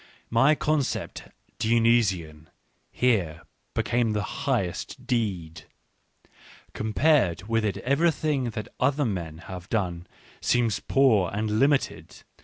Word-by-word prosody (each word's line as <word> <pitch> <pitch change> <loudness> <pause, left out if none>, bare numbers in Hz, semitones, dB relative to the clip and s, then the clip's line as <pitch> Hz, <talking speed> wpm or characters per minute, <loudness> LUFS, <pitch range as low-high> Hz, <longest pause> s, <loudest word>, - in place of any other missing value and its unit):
My 135 +7 +5
concept 150 -2 -2 0.2
" - - -39
Dion^si^n 110 -9 +1 0.2
" - - -44
here 95 -11 +1 0.3
be - - +1
came 120 -2 +1
the 105 - 0
highest^ssA; 95 - -2 1.1
compared 110 - +1
with 115 -1 +1
it 105 -2 -1
everything 150 0 +1
that 110 -3 -5
other 140 +3 +2
men 85 -8 -4
have 90 -1 -8
done 90 -5 -2 0.3
seems 115 -4 +1
poor 115 -10 +3
and 105 +1 -1
limited. 130 - 0
110 Hz, 110 wpm, -26 LUFS, 90-125 Hz, 1.1 s, My